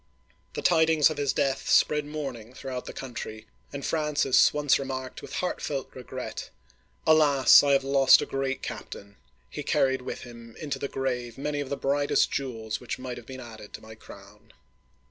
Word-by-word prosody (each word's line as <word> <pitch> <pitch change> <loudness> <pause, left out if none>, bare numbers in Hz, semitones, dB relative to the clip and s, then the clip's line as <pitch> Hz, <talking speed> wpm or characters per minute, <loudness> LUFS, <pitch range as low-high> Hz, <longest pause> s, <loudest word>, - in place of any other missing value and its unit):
The - - -4
tidings 160 -3 +4
of 155 - -5
his 145 -2 +1
death 135 -1 -1
spread 150 -1 +3
mourning 130 -6 -6
throughout 130 -2 -6
the - - -6
country, 115 -4 -7 0.3
and 140 -1 -6
Francis 150 -4 +3
once 150 -2 +2
remarked 130 -1 -5
with - - -10
heartfelt 145 -6 -3
regret: 130 -1 -7 0.3
" - - -39
Alas, 150 -4 +7
I 140 -1 +2
have 135 -1 +3
lost 135 0 +6
a - - -2
great 135 0 -3
captain. 100 0 -8 0.3
He - - -7
carried 130 -1 +1
with - - -6
him 115 -1 -12
into 150 -3 -4
the 140 - -2
grave 125 -4 -3
many 145 +1 -2
of 140 -2 -4
the 140 - -2
brightest 145 +1 +1
jewels 115 -5 -3
which 125 - -4
might 130 -1 -6
have 120 - -11
been 130 -1 -8
added 110 -4 -11
to - - -8
my 110 0 -12
crown 110 - -15
135 Hz, 180 wpm, -27 LUFS, 125-145 Hz, 0.3 s, Alas